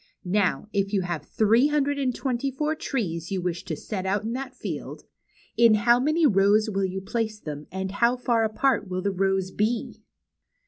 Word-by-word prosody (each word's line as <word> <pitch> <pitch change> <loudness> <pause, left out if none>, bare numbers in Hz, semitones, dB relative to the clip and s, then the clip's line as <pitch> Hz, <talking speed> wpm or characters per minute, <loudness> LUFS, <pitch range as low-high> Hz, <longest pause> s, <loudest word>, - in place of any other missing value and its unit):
Now, 195 +2 +1
if 200 0 0
you 195 - +2
have 175 -4 -3
three 225 +5 +3
hundred 285 -1 0
and 255 -3 0
twenty 265 0 -1
four 300 +4 -1
trees 185 - -3
you 195 - -1
wish 175 -1 -3
to 160 - -3
set 190 +4 -5
out 195 +2 0
in 225 +2 -3
that 260 0 -5
field, - - -6 0.5
in 230 -2 +6
how 235 +3 +4
many 310 +5 +2
rows 210 -1 +4
will 195 -1 0
you 190 +1 -4
place 215 +1 -3
them, 150 -5 -7
and 190 +1 -3
how 235 +5 +2
far 240 -2 +1
apart 220 -1 +1
will 185 0 -3
the 200 - +1
rows 190 0 0
be 220 +4 -2
215 Hz, 190 wpm, -25 LUFS, 190-245 Hz, 0.5 s, in